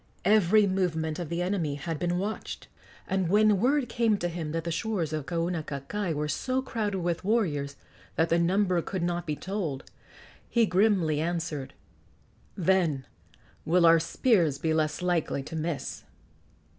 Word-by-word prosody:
Every 210 0 +5
movement 165 -5 -1
of 170 -4 -4
the 170 +1 -1
enemy 175 -6 -1
had 150 +2 -4
been 175 +1 0
watched; 205 +4 -4 0.4
and 190 -3 0
when 210 0 +4
word 265 +4 +2
came 230 -3 +1
to 175 -2 -2
him 165 -3 -4
that 165 +1 -2
the 170 - -3
shores 175 -4 -2
of 155 -3 -3
Kaunakakai 170 +1 -2
were 150 +1 -1
so 255 - -1
crowded 215 -6 -2
with 175 0 -1
warriors 160 -10 0 0.4
that 165 +1 +2
the 170 - +3
number 180 0 +2
could 185 +1 -4
not 175 0 -2
be 150 - -1
told, 175 -7 -4 0.7
he 235 -2 +3
grimly 185 -6 +2
answered: 165 -4 -3 0.8
"Then 170 -7 +2 0.6
will 170 +2 +3
our 165 0 +7
spears 165 - +2
be 160 +2 0
less 155 +2 0
likely 170 -6 0
to 155 +4 -8
miss!" 160 -1 -3
175 Hz, 155 wpm, -28 LUFS, 160-195 Hz, 0.8 s, our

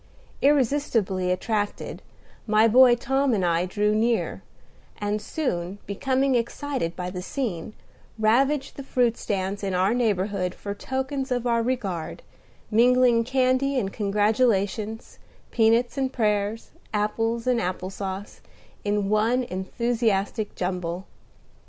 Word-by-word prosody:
Irresistibly 245 -10 +2
attracted, 205 +2 -2 0.5
my 215 +1 +5
boy 245 +2 +7
Tom 270 +1 +1
and 190 -3 0
I 170 +1 +1
drew 210 +2 +1
near, 230 +2 0 0.6
and 205 +1 -2
soon, 190 - -3
becoming 265 +6 0
excited 240 - -2
by 180 0 -4
the 180 -1 -5
scene, 210 -4 -4 0.4
ravaged 265 +6 +2
the 275 - -6
fruit 245 -3 +1
stands 200 -1 -3
in 195 -2 -1
our 190 +4 +2
neighborhood 200 -5 0
for 200 - -5
tokens 265 +4 -3
of 245 -1 0
our 235 -1 +2
regard, 205 -9 -3 0.5
mingling 240 +1 +4
candy 260 +2 +1
and 195 -6 -1
congratulations, 210 +1 0 0.3
peanuts 235 +4 +2
and 265 -1 0
prayers, 210 -2 -1 0.2
apples 225 +2 0
and 250 -2 +2
applause, 190 +2 -5 0.4
in 205 -1 0
one 220 +5 +2
enthusiastic 215 +1 -1
jumble. 180 0 -3
220 Hz, 115 wpm, -25 LUFS, 195-250 Hz, 0.6 s, boy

